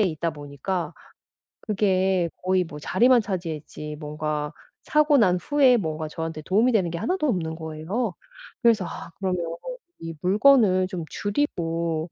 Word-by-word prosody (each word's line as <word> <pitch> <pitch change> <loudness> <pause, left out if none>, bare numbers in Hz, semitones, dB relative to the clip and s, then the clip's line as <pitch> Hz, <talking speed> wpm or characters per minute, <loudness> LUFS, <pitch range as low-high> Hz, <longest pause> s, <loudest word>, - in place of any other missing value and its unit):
있다 170 -4 0
보니까 150 +3 -4 0.7
그게 190 -4 +1
거의 185 0 +2
뭐 150 -2 -9
자리만 235 - +4
차지했지 160 -6 -5
뭔가 150 0 -3 0.3
사고 300 -1 +4
난 185 -6 +4
후에 275 -4 +4
뭔가 160 -5 -3
저한테 160 0 -5
도움이 220 +9 +3
되는 185 -6 +2
게 170 - -3
하나도 360 - 0
없는 165 - -1
거예요. 165 +8 -3 0.5
그래서 225 -6 +4
'아 - - -7
그러면 185 -2 -1 0.6
이 165 0 -6
물건을 200 -2 +4
좀 180 -4 -5
줄이고 170 - -2
180 Hz, 285 characters per minute, -25 LUFS, 160-210 Hz, 0.7 s, 자리만